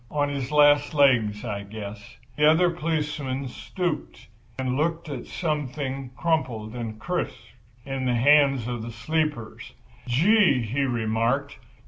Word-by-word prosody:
On 145 -1 0
his 135 -2 -3
last 145 0 +4
legs, 125 -7 +3
I 105 -3 -3
guess." 105 0 -9 0.2
The 150 0 +5
other 175 +3 +4
policeman 150 -5 -2
stooped 165 - -4 0.3
and 130 -1 -1
looked 165 +2 -1
at 135 -4 -6
something 140 -4 -3
crumpled 125 -10 -1
and 115 -3 -5
crisp 175 -2 -3 0.5
in 135 -1 -3
the 125 -1 +1
hand 135 -1 +4
of 120 -2 -3
the 115 - -6
sleeper. 150 0 -2 0.5
"Gee!" 160 - +4
he 125 +6 -2
remarked. 120 +3 -1
135 Hz, 130 wpm, -25 LUFS, 120-150 Hz, 0.5 s, The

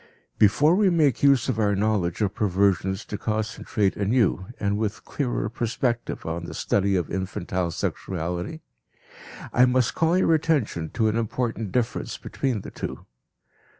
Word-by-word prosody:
Before 145 - +5
we 200 +1 +4
make 155 -8 +2
use 140 -3 +4
of 125 -4 -1
our 100 -2 +2
knowledge 100 -3 0
of 100 -2 +1
perversions 95 -1 +1
to 105 - -5
concentrate 110 -2 -1
anew 100 -3 +1
and 100 -1 0
with 105 0 -3
clearer 125 -7 -2
perspective 120 +1 -2
on 85 +1 -3
the - - -7
study 100 -1 +1
of 90 -3 -1
infantile 95 -1 -2
sexuality, 90 - -3 0.9
I 125 - +6
must 125 -1 +2
call 165 +2 +2
your 175 -3 +3
attention 145 - 0
to 110 -2 +2
an 110 - +1
important 115 -2 -2
difference 125 -2 -1
between 125 -7 -2
the - - -9
two. - - -6
110 Hz, 150 wpm, -25 LUFS, 95-125 Hz, 0.9 s, I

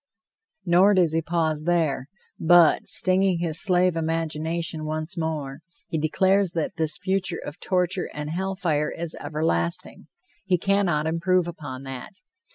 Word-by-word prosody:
Nor 185 +3 +4
does 175 -4 +2
he 165 - +1
pause 160 -2 -1
there, 160 -7 0 0.3
but, 170 -1 +4
stinging 185 0 +4
his 165 -2 +3
slave 180 -2 +3
imagination 160 0 -2
once 155 +4 -4
more, 155 -5 -4 0.3
he 160 - -2
declares 190 +4 +1
that 165 -1 -3
this 155 -2 +1
future 190 -1 -2
of 145 - -8
torture 180 0 -1
and 150 +1 -6
hell 190 +3 -3
fire 155 -5 -1
is 170 -1 -5
everlasting. 85 - -2 0.4
He 185 -2 +1
cannot 180 -5 +1
improve 170 +2 +1
upon 145 -6 -8
that. 135 +9 -8
165 Hz, 140 wpm, -24 LUFS, 155-180 Hz, 0.4 s, Nor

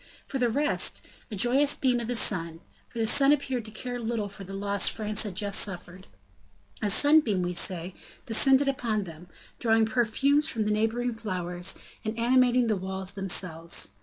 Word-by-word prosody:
For 270 - -4
the 245 -1 +2
rest, 290 +6 0 0.2
a 215 - -6
joyous 265 +8 +3
beam 250 -2 +1
of 235 - -4
the 245 - -2
sun, 165 -7 0 0.3
for - - -13
the 225 - +1
sun 275 +5 +5
appeared 265 -5 -1
to - - -8
care 245 +3 -6
little 225 -3 -3
for 195 0 -8
the 195 - -10
loss 200 0 +1
France 215 -1 -2
had 205 -5 -3
just 200 +1 0
suffered; 185 -1 -4 0.7
a 210 - 0
sunbeam, 250 -6 +4
we 175 0 -2
say, 175 0 0 0.3
descended 270 +3 +5
upon 235 -6 -1
them, 170 -1 -11 0.3
drawing 225 -1 +3
perfumes 260 +6 +1
from 220 -3 -2
the 210 - 0
neighboring 225 +3 0
flowers, 180 -4 -4 0.3
and 215 +1 -4
animating 250 +1 +3
the 220 -2 +1
walls 190 0 -5
themselves. 175 - -3
220 Hz, 175 wpm, -27 LUFS, 190-245 Hz, 0.7 s, sun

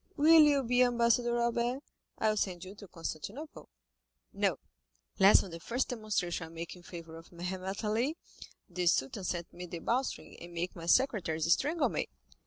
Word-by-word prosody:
Will 315 +2 +7
you 290 -2 +5
be 245 +1 +2
ambassador, 240 -1 +3
Albert? 235 +3 0 0.3
I 220 - +2
will 215 - +1
send 185 -3 -2
you 190 - -9
to 205 -1 -12
Constantinople." 200 - -7 0.6
"No, - - +1 0.6
lest 195 +1 +7
on 190 - -9
the 165 - -7
first 240 +9 -2
demonstration 200 -8 -2
I - - -13
make 165 +2 -7
in 180 - -14
favor 165 -2 -10
of 165 - -14
Mehemet 185 +3 -5
Ali, 235 +9 0 0.5
the 180 0 -2
Sultan 170 +3 +1
send 175 -1 -4
me 180 +1 -8
the 170 - -6
bowstring, 245 +10 -2
and 170 0 -10
make 170 +2 -3
my 165 -1 -8
secretaries 170 - +3
strangle 315 +4 +1
me." - - -2
195 Hz, 175 wpm, -31 LUFS, 170-245 Hz, 0.6 s, Will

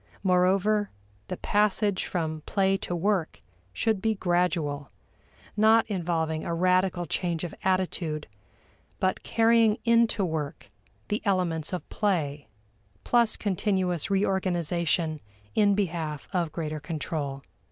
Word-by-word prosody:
Moreover, 195 +3 +3 0.4
the 185 - -4
passage 205 -1 +1
from 160 -3 -3
play 195 -1 +2
to 180 -2 -3
work 185 -1 0 0.3
should 220 - 0
be 220 +1 +1
gradual, 175 -6 0 0.7
not 220 +2 +5
involving 165 -5 -1
a 170 - -2
radical 180 0 +2
change 170 0 -2
of 175 - -4
attitude 180 -5 0 0.7
but 185 0 0
carrying 225 -1 +3
into 230 -3 +3
work 160 -2 -4 0.4
the 210 - -1
elements 180 -6 0
of 180 - -4
play, 155 -9 -1 0.6
plus 235 -2 +3
continuous 190 -4 0
reorganization 175 -4 0 0.3
in 205 -2 +4
behalf 165 -7 -2
of 175 -4 0
greater 155 -2 -4
control. 150 -2 -4
180 Hz, 110 wpm, -27 LUFS, 160-200 Hz, 0.7 s, not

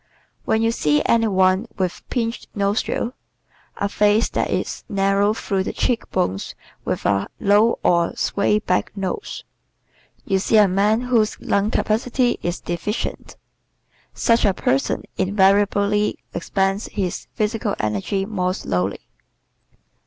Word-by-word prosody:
When 220 +1 +1
you 225 - +3
see 150 -9 +1
any 225 -1 +3
one 190 +2 +2
with 185 -2 -2
pinched 230 -1 -2
nostrils, 205 +4 -1 0.6
a 200 - 0
face 210 +2 +2
that - - -1
is - - -2
narrow 200 +1 +2
through 195 -4 -1
the - - -4
cheek 245 -3 -1
bones 95 - -2 0.3
and - - -2
a 100 0 +1
low 205 +3 +4
or 170 -1 +2
"sway 205 +1 +1
back" 185 -4 0
nose, 195 - -4 0.8
you 195 -1 +1
see 220 +3 +2
a 210 -1 +7
man 205 +4 +2
whose 235 -4 +1
lung 200 +1 0
capacity 240 +3 0
is 175 0 -2
deficient. 190 +5 -4 0.7
Such 230 0 +2
a 195 -3 +3
person 135 -5 0
invariably 200 +1 +2 0.2
expends 195 +1 -1
his 190 -4 -3
physical 215 0 -1
energy 105 - -1
more 185 -3 -1
slowly. 90 - -2
200 Hz, 130 wpm, -21 LUFS, 185-220 Hz, 0.8 s, a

